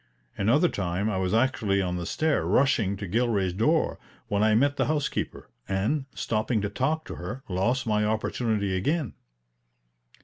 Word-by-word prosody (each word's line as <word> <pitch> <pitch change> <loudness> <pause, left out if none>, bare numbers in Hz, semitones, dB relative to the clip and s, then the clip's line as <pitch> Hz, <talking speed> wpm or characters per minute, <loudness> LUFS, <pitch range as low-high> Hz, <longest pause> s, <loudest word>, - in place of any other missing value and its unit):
Another 120 - +3
time 95 - -1
I 95 - -1
was 95 -1 0
actually 110 -4 +2
on 90 -2 -1
the 85 -1 -4
stair 155 -1 +1
rushing 110 -8 +2
to 100 0 -5
Gilray's 105 -3 +1
door, 150 - +1 0.3
when 100 0 +1
I 110 0 +4
met 140 +5 +3
the - - +1
housekeeper, 150 -2 -2 0.2
and, 105 +9 0
stopping 110 +1 0
to 105 - -2
talk 150 +8 -1
to - - -7
her, 115 +10 -6
lost 115 +8 0
my 105 -2 +1
opportunity 110 -2 0
again. 145 - -1
110 Hz, 160 wpm, -27 LUFS, 100-130 Hz, 0.3 s, I